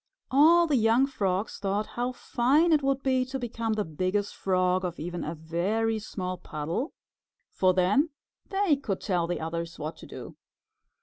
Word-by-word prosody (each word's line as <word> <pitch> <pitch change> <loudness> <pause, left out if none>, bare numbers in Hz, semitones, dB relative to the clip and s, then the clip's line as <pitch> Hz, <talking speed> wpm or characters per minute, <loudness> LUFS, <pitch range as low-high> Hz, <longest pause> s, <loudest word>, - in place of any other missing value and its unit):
All 325 +6 +6
the 295 -5 +2
young 230 +3 +4
Frogs 200 -6 -2
thought 200 +1 -1
how 245 +3 -3
fine 270 +7 +2
it 305 -2 +4
would 275 -1 0
be 260 -1 +2
to 265 +1 -4
become 230 -2 -2
the 215 -1 -1
Biggest 185 +6 -1
Frog 185 -1 +1
of 175 -1 -4
even 175 +2 -4
a 160 +3 -4
very 195 +8 -1
small 185 -4 -5
puddle, 165 - -4 0.6
for 185 -1 +2
then 205 - +3 0.4
they 390 -7 +2
could 210 -9 -3
tell 175 -4 0
the 175 - -2
others 170 +1 -4
what 155 +1 -5
to - - -12
do. - - -9
205 Hz, 170 wpm, -28 LUFS, 180-260 Hz, 0.6 s, All